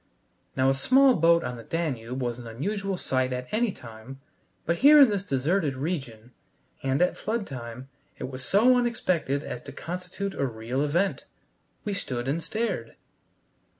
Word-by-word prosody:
Now 130 +1 +3
a - - +3
small 260 - +5
boat 170 -3 +4
on 125 -1 -4
the 115 - -9
Danube 130 -4 -3
was 120 0 -2
an 120 - -9
unusual 195 - -3
sight 130 -5 0
at 125 0 -4
any 225 0 +1
time, 115 0 -11 0.5
but 170 +1 +1
here 295 - +8
in 275 -4 +8
this 200 -2 -1
deserted 145 0 0
region, 130 -6 -4 0.5
and 135 +4 +2
at 180 - +1
flood 220 -1 -2
time, 125 -2 -8 0.3
it - - -7
was 130 0 -6
so 225 - +5
unexpected 185 - 0
as 120 - -6
to - - -10
constitute 180 +3 -5
a 140 - -1
real 120 +3 -3
event. 170 +7 0 0.6
We 205 - -1
stood 125 -10 -3
and 150 +5 0
stared. 185 - -3
145 Hz, 165 wpm, -27 LUFS, 125-195 Hz, 0.6 s, here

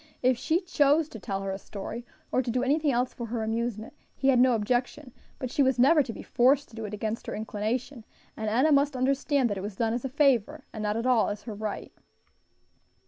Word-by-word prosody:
If 255 0 +4
she 320 +9 0
chose 300 -3 +2
to 225 - -9
tell 195 0 -4
her 195 - -2
a 195 - -4
story, 220 +5 -7 0.2
or 255 - +2
to 250 - -5
do 250 +2 0
anything 295 +2 +2
else 250 0 0
for 235 - -6
her 225 0 -3
amusement, 225 0 -3 0.2
he 270 - +1
had 255 -2 +4
no 255 0 +5
objection, 245 +4 -2 0.2
but 255 -2 -5
she - - +1
was 265 -1 +3
never 295 +6 +6
to 250 - -4
be - - -9
forced 265 +4 +2
to 225 - -15
do 225 -1 -5
it 210 - -7
against 220 +2 -4
her - - -3
inclination, 225 +4 -3 0.3
and 220 -1 -3
Enna 260 +8 +3
must 280 -1 +3
understand 275 +1 +1
that 200 - -2
it - - -5
was 205 0 -6
done 225 +1 0
as 240 - -3
a 265 - -2
favor, 275 0 +2
and 215 - -5
not 210 +1 -1
at 230 - -2
all 250 -3 +3
as 205 0 -5
her 225 - -6
right. 210 0 -5
245 Hz, 235 wpm, -27 LUFS, 220-270 Hz, 0.3 s, never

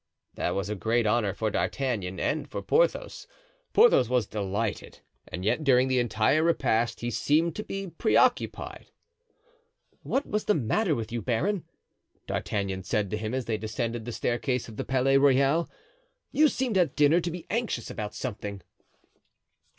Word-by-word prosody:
That 90 - -2
was 100 +1 -2
a 105 - -2
great 115 +4 0
honor 105 -1 +2
for 110 +2 -2
D'Artagnan 100 -11 -2
and 155 - -1
for - - -5
Porthos. - - +1 0.4
Porthos 440 - +5
was 125 -3 +2
delighted; 100 +1 -3 0.3
and 90 +1 -6
yet 155 - +1
during 130 -2 +4
the 130 -1 +2
entire 120 +5 +2
repast 120 -9 +1
he 120 0 -2
seemed 155 +8 +1
to 215 - -3
be 195 -1 -5
preoccupied. 175 +6 +1 1.1
"What 275 - -1
was 210 0 -2
the 210 - +3
matter 155 - +1
with 115 -1 -5
you, 120 -1 -2
baron?" 170 - -1 0.6
D'Artagnan 95 -2 -2
said 105 -2 -1
to 105 - -1
him 110 +3 -3
as 130 -2 -2
they 110 -2 -2
descended 115 +1 -3
the 120 - -4
staircase 125 +2 -1
of 110 -2 -11
the - - -2
Palais 135 +1 +3
Royal. 140 +4 +3 0.6
"You 305 +1 +5
seemed 250 -8 0
at 160 -5 +1
dinner 150 +4 +4
to 175 - -2
be 170 0 -7
anxious 225 - -2
about 105 -1 -5
something." 100 -5 -5
125 Hz, 160 wpm, -27 LUFS, 110-160 Hz, 1.1 s, Porthos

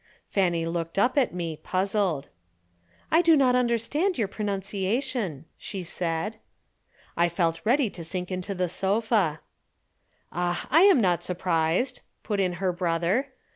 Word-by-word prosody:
Fanny 175 -4 +1
looked 165 +1 -3
up 245 +5 +3
at 275 -4 +3
me, 170 -3 -4
puzzled. 185 -5 -1 0.8
"I 325 - +6
do 330 -2 +5
not 255 -3 +4
understand 250 - +1
your 220 -4 +1
pronunciation," 200 - -2
she 195 -3 -5
said. 175 +5 -3 0.8
I 170 0 +3
felt 165 -1 0
ready 255 +3 +3
to 170 - -7
sink 180 +3 -5
into 185 +2 -3
the 180 0 0
sofa. 195 -3 0 0.9
"Ah, 175 0 -1
I 320 +4 +6
am 380 -11 +6
not 180 -4 +2
surprised," 180 +7 0 0.2
put 205 -2 -2
in 185 -2 +1
her 185 +1 0
brother. 175 +9 0
190 Hz, 135 wpm, -26 LUFS, 170-235 Hz, 0.9 s, I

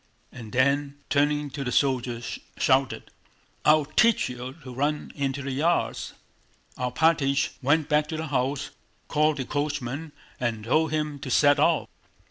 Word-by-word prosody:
and 115 -3 -10
then, 140 +3 +1 0.2
turning 145 0 +1
to 140 0 -4
the 125 - -3
soldiers, 125 -4 0 0.2
shouted: - - +1 0.5
"I'll 150 -1 +5
teach 225 - +3
you 125 +1 -6
to 130 -1 -8
run 145 +4 -1
into 140 -1 -2
the 140 - -3
yards!" 160 +6 0 0.6
Alpátych 140 +2 +2
went 145 +3 +2
back 150 -1 +2
to 160 - -4
the 160 -1 -4
house, 135 +2 -1 0.4
called 155 0 +2
the 130 - -3
coachman, 145 +1 -3 0.3
and 115 -3 -2
told 155 +8 +2
him 150 -2 -2
to 135 - -6
set 145 +2 +4
off. 160 +1 +3
145 Hz, 145 wpm, -26 LUFS, 130-150 Hz, 0.6 s, I'll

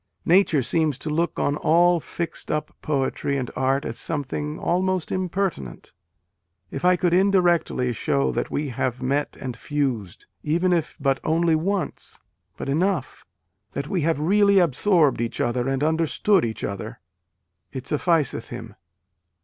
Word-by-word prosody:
Nature 170 -6 +4
seems 155 0 +1
to 150 +3 -5
look 170 +3 0
on 145 - +1
all 170 +3 +4
fixed 170 +1 -6
up 150 -1 -2
poetry 140 -1 -1
and 130 -3 -3
art 135 +2 +1
as - - -4
something 150 0 -3
almost 185 0 0
impertinent.... 185 - -3 0.8
If 135 - -5
I 180 0 +5
could 175 -1 +1
indirectly 175 -9 +2
show 140 +5 0
that - - -2
we 145 0 -2
have 125 0 -2
met 140 +3 -1
and 130 -3 -5
fused, 125 - -3 0.2
even 175 +4 +1
if 165 -3 -1
but 135 -1 +1
only 165 +1 +2
once, 190 +4 -2 0.4
but - - -5
enough 160 -1 -1 0.5
that 140 - -4
we 180 - 0
have 160 -1 +1
really 200 +5 +4
absorbed 170 - +3
each 115 - -3
other 120 +1 0
and 135 +1 -1
understood 165 - +2
each 110 -1 -5
other," 100 -1 -5 0.7
it 130 -1 -6
sufficed 150 -6 0
him. 115 -3 -8
150 Hz, 145 wpm, -24 LUFS, 135-175 Hz, 0.8 s, I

